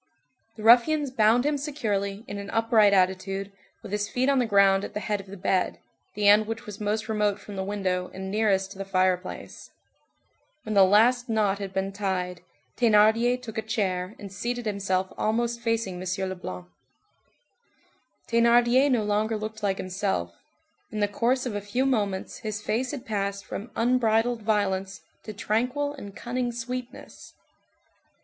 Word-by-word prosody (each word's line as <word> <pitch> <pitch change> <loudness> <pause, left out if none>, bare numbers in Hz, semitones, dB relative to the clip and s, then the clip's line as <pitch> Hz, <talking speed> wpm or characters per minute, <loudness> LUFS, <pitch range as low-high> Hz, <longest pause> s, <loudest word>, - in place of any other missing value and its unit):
The 215 - -9
ruffians 255 +5 +5
bound 230 +1 +3
him 295 -1 +1
securely, 210 -8 -3
in 200 - -5
an 200 0 -7
upright 225 -2 +4
attitude, 195 +1 0 0.3
with 195 - -9
his 205 0 -1
feet 255 +2 +1
on 275 -1 +3
the 245 - +1
ground 200 -2 +4
at - - -7
the - - -1
head 210 0 -2
of 195 - -18
the 200 +1 -9
bed, 185 0 0 0.4
the 205 0 +1
end 210 +1 +6
which 225 0 -5
was 210 0 -9
most 215 +1 -1
remote 210 -2 0
from 205 - -10
the 190 - -2
window, 190 -2 -2
and 190 0 -6
nearest 195 -2 +1
to 195 - -11
the - - -2
fireplace. 185 -1 -2 0.9
When 215 - -4
the 200 -1 +7
last 235 +5 +4
knot 210 -3 +1
had 195 -1 -5
been 190 0 -2
tied, 185 -3 -3 0.4
Thénardier 230 +2 +4
took 225 -3 -6
a - - -1
chair 200 -3 -2
and 200 -2 -9
seated 240 +3 -3
himself 190 -3 -1
almost 235 +2 0
facing 225 -6 -1
M. 185 +1 -2
Leblanc. 90 - -7 1.6
Thénardier 240 +3 +4
no 240 -5 +2
longer 210 +2 0
looked 215 +1 -6
like 195 -2 0
himself; 185 - -2 0.6
in 215 - -4
the 205 - +2
course 240 +5 0
of 245 - -3
a 205 - -3
few 225 +6 -1
moments 205 -7 -1
his 215 -1 -4
face 230 +4 -1
had 270 -2 -6
passed 200 -3 -3
from 215 +5 -6
unbridled 235 -1 +2
violence 200 -2 -1 0.2
to 215 - -8
tranquil 250 +8 -1
and 205 -8 -10
cunning 245 0 -2
sweetness. 245 +1 -7
210 Hz, 165 wpm, -26 LUFS, 195-235 Hz, 1.6 s, the